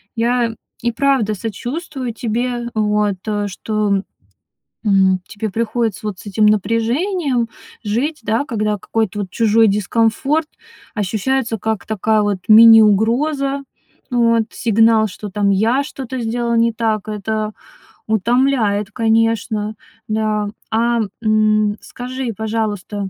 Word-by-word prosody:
Я 235 0 0 0.3
и 235 - 0
правда 260 -4 +1
сочувствую 250 - -5
тебе, 240 +1 -2
вот. 210 -2 +1
Э, 205 -1 -1
что, 205 0 -1 0.8
м, 190 -3 +3
тебе 215 0 -5
приходится 225 -1 -2
вот 205 -3 -4
с - - -13
этим 210 +1 +2
напряжением 235 - +1 0.4
жить, 245 +9 -2
да, 220 +5 0
когда 210 -5 -1
какой-то 220 0 -2
вот 195 -2 -4
чужой 225 +2 +3
дискомфорт 230 - +1 0.5
ощущается 225 +3 -1
как 220 0 -2
такая 220 0 +1
вот 205 -2 -1
мини-угроза. 230 +6 +5 0.5
Вот. 230 -2 +3
Сигнал, 225 0 +3
что 210 +1 -8
там 200 0 +1
я 230 +8 +2
что-то 265 -3 -6
сделал 235 0 -1
не 230 0 +3
так. 220 -2 -1
Это 215 0 -3 0.5
утомляет, 220 -1 +1
конечно. 225 -2 0 0.3
Да. 215 -1 0 0.2
А, 235 +1 +2 0.2
м, 215 -1 +2
скажи, 255 0 -5
пожалуйста, 210 -3 -3
220 Hz, 115 wpm, -18 LUFS, 210-235 Hz, 0.8 s, мини-угроза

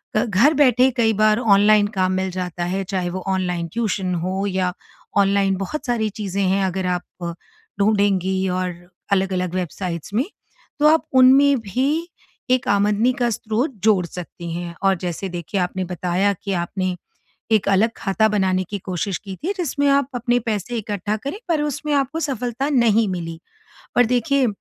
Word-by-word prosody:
अ, 215 - +3
घर 230 +8 +4
बैठे 260 -3 +4
कई 225 -2 +3
बार 215 +1 +3
ऑनलाइन 210 -2 +5
काम 185 0 +2
मिल 190 0 -1
जाता 180 -1 -3
है, 190 +2 -2
चाहे 185 -2 -2
वो 185 +1 -5
ऑनलाइन 180 -3 -1
ट्यूशन 195 -5 -1
हो 190 +2 -1
या 185 -2 -1 0.4
ऑनलाइन 195 -1 +3
बहुत 195 +11 -4
सारी 235 -4 0
चीज़ें 200 -1 -1
हैं 195 +1 +2
अगर 190 0 -2
आप 170 -1 -8 0.4
ढूँढेंगी 195 -2 +2
और 180 0 -1 0.4
अलग-अलग 185 -2 0
वेबसाइट्स 180 -1 -4
में। 240 +6 +1 0.5
तो 300 - +5
आप 315 +1 +4
उनमें 265 +2 +6
भी 225 +6 -1 0.6
एक 255 -1 +2
आमदनी 205 +4 +3
का 240 -1 +2
स्रोत 225 +5 -1
जोड़ 205 -5 +4
सकती 170 0 -8
हैं 170 0 -5
और 195 0 +4
जैसे 180 +2 -3
देखिए 175 +3 -4
आपने 180 +1 -2
बताया 180 +3 0
कि 200 - -2
आपने, 185 +1 -2 0.6
एक 215 -3 +3
अलग 200 +4 +3
खाता 220 +2 +1
बनाने 190 -3 +1
की 205 - -3
कोशिश 185 0 -3
की 195 -2 -8
थी, 345 - -3
जिसमें 285 -5 0
आप 280 -1 +3
अपने 245 0 +1
पैसे 220 +3 -2
इकट्ठा 210 -1 -2
करें, 280 - -6
पर 320 -3 +2
उसमें 300 +1 -3
आपको 280 +3 0
सफलता 260 -1 -2
नहीं 230 -5 +3
मिली 165 -3 -5 0.6
और 245 - +6
देखिए 250 +3 +2
200 Hz, 165 wpm, -21 LUFS, 185-240 Hz, 0.6 s, उनमें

